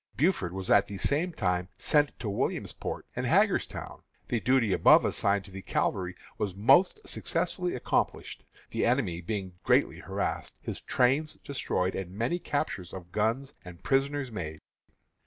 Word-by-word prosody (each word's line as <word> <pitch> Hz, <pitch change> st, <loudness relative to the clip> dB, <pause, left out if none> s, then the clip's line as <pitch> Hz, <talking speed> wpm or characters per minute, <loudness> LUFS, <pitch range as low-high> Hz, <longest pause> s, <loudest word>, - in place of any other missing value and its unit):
Buford 145 Hz, -, +1 dB
was 95 Hz, 0 st, -3 dB
at -, -, +5 dB
the 100 Hz, -, -6 dB
same 155 Hz, -, +1 dB
time 90 Hz, -, -1 dB
sent 145 Hz, -1 st, +2 dB
to 115 Hz, -, -4 dB
Williamsport 100 Hz, -, -3 dB
and -, -, -1 dB
Hagerstown. -, -, +1 dB, 0.3 s
The 120 Hz, -, +1 dB
duty 120 Hz, -4 st, +3 dB
above -, -, +6 dB
assigned 100 Hz, 0 st, +1 dB
to 100 Hz, -, -12 dB
the 95 Hz, +1 st, -7 dB
cavalry 90 Hz, -1 st, -1 dB, 0.2 s
was 100 Hz, -3 st, -2 dB
most 175 Hz, -, +4 dB
successfully 180 Hz, -1 st, -1 dB
accomplished, 125 Hz, -, -1 dB, 0.3 s
the -, -, -1 dB
enemy 115 Hz, -9 st, +1 dB
being 95 Hz, -1 st, -4 dB
greatly -, -, +3 dB
harassed, -, -, -3 dB
his -, -, -6 dB
trains 135 Hz, +5 st, +2 dB
destroyed, 95 Hz, -9 st, -1 dB
and 95 Hz, -2 st, -4 dB
many 125 Hz, +11 st, 0 dB
captures 145 Hz, -, -3 dB
of 90 Hz, -2 st, -9 dB
guns 115 Hz, +8 st, 0 dB
and 90 Hz, -1 st, -12 dB
prisoners 135 Hz, -1 st, +1 dB
made." 80 Hz, -7 st, -5 dB
105 Hz, 150 wpm, -29 LUFS, 95-140 Hz, 0.3 s, above